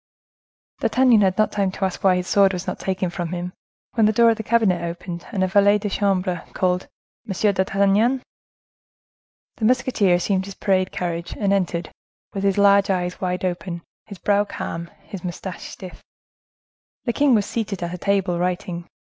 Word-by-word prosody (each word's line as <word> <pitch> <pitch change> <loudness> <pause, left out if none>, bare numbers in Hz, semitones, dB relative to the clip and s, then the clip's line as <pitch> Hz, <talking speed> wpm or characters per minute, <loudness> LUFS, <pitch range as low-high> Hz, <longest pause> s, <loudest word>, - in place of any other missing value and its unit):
D'Artagnan 250 -4 +4
had 190 -2 +2
not 215 - +2
had - - -10
time 195 -2 +1
to 195 - -1
ask 190 - -4
why 190 -2 +5
his 180 0 -2
sword 200 -1 +4
was 180 0 -4
not - - -4
taken 190 -2 -2
from 175 -1 -4
him, 180 +1 -4 0.4
when 225 -3 +4
the - - +4
door 230 +1 +5
of 225 - -1
the - - -3
cabinet 220 -6 +2
opened, 170 0 -6
and 195 -5 0
a - - +2
valet 205 +2 +4
de 205 -1 -4
chambre 185 -4 0
called, 180 0 0 0.4
"M. 200 +2 +1
d'Artagnan!" 200 +6 +2 1.3
The 220 - -1
musketeer 245 -6 +3
assumed 190 +2 0
his 200 -1 -9
parade 190 -2 +1
carriage, 170 -1 -4
and 200 -1 +1
entered, 175 -3 -1 0.4
with 195 - -3
his 195 -1 +2
large 200 0 +5
eyes 180 -1 -1
wide 180 0 -1
open, 175 -1 -4 0.2
his 200 - -9
brow 205 +2 +2
calm, 170 -4 -6
his 195 -2 -9
moustache 180 0 -6
stiff. 185 -1 -10 1.0
The 235 - -1
king 285 -2 +4
was 205 -2 +2
seated 205 -6 -3
at 170 0 -3
a 180 - -6
table 195 -3 0
writing. 175 -1 -2
190 Hz, 185 wpm, -22 LUFS, 180-205 Hz, 1.3 s, why